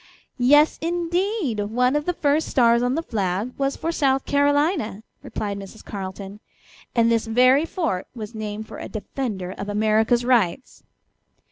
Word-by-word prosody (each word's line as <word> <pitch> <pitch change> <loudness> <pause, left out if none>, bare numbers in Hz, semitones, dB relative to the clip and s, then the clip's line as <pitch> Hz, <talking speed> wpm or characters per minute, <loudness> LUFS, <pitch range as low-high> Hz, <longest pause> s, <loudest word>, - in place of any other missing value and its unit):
"Yes, 290 +5 +5
indeed! 345 - -1
One 245 +6 +1
of 295 0 0
the 355 - 0
first 295 +1 +1
stars 235 -2 +3
on 250 +2 +1
the 325 - -2
flag 200 - -2
was 275 0 -1
for 330 - -2
South 270 -4 +1
Carolina," 285 - +1 0.2
replied 200 -1 -4
Mrs. 195 +3 -11
Carleton, 195 0 -7 0.6
"and 230 -1 +4
this 230 0 +1
very 255 +6 +4
fort 325 - -2
was 215 -1 -7
named 215 0 -5
for - - -9
a - - -7
defender 210 -4 -4
of 195 +1 -6
America's 220 +3 +2
rights." 240 -2 +1
240 Hz, 150 wpm, -23 LUFS, 210-285 Hz, 0.6 s, Yes